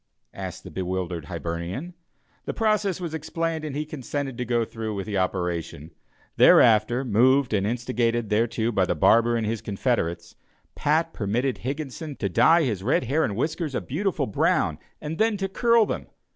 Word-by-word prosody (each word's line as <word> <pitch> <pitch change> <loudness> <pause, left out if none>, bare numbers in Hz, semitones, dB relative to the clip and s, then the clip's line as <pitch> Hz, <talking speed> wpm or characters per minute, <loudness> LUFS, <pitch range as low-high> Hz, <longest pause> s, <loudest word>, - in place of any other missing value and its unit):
asked - - -7
the - - -10
bewildered 90 -3 -3
Hibernian. 85 - -5 0.5
The - - -4
process 215 -5 +1
was 170 -3 -5
explained 160 +1 -3
and 150 -3 -5
he 150 +1 -2
consented 140 -2 -4
to 125 - -1
go 120 -1 +1
through 110 -1 -5
with 100 - -4
the 100 -3 -1
operation. 85 -4 -3 0.5
Thereafter, 115 +4 +5
moved 125 +3 +3
and 100 -1 +1
instigated 115 -1 -1
thereto 115 +1 +1
by 95 -4 +1
the - - 0
barber 115 +8 +4
and 115 - -1
his 110 0 -2
confederates, 95 -6 -2 0.4
Pat 160 +2 +1
permitted 120 +6 -1
Higginson 145 +2 -5
to 100 - -2
dye 165 - +5
his 110 -9 -1
red 125 +7 +1
hair 145 +6 +1
and 100 - -1
whiskers 150 - -2
a - - +1
beautiful 165 0 -1
brown, 105 - +1 0.2
and 155 +1 -6
then 220 -1 +2
to 195 0 -2
curl 230 +3 +3
them. - - -4
120 Hz, 170 wpm, -25 LUFS, 100-155 Hz, 0.5 s, Thereafter